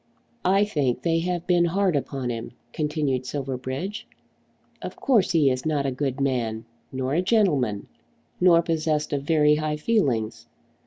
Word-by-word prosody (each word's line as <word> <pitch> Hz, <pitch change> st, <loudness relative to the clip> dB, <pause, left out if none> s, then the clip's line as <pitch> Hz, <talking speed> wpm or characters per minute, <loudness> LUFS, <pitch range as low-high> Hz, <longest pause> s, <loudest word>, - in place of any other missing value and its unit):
"I 195 Hz, +3 st, +4 dB
think 135 Hz, -10 st, -1 dB
they 165 Hz, -1 st, +2 dB
have 175 Hz, 0 st, -2 dB
been 175 Hz, -1 st, +3 dB
hard 185 Hz, 0 st, +1 dB
upon 135 Hz, -3 st, -2 dB
him," 115 Hz, 0 st, -6 dB, 0.2 s
continued 150 Hz, -4 st, -1 dB
Silverbridge. 135 Hz, +9 st, -4 dB, 0.7 s
"Of -, -, -6 dB
course 230 Hz, -9 st, +2 dB
he 150 Hz, -5 st, +4 dB
is 130 Hz, 0 st, -2 dB
not 150 Hz, -3 st, 0 dB
a 135 Hz, -, 0 dB
good 135 Hz, +1 st, -3 dB
man, 115 Hz, -5 st, -1 dB, 0.3 s
nor 130 Hz, +1 st, -2 dB
a 170 Hz, -, +2 dB
gentleman, 155 Hz, -, +1 dB, 0.5 s
nor 170 Hz, -2 st, +5 dB
possessed 155 Hz, -2 st, -1 dB
of 140 Hz, -, 0 dB
very 150 Hz, 0 st, +3 dB
high 155 Hz, 0 st, -2 dB
feelings. 120 Hz, -, 0 dB
150 Hz, 150 wpm, -24 LUFS, 130-170 Hz, 0.7 s, nor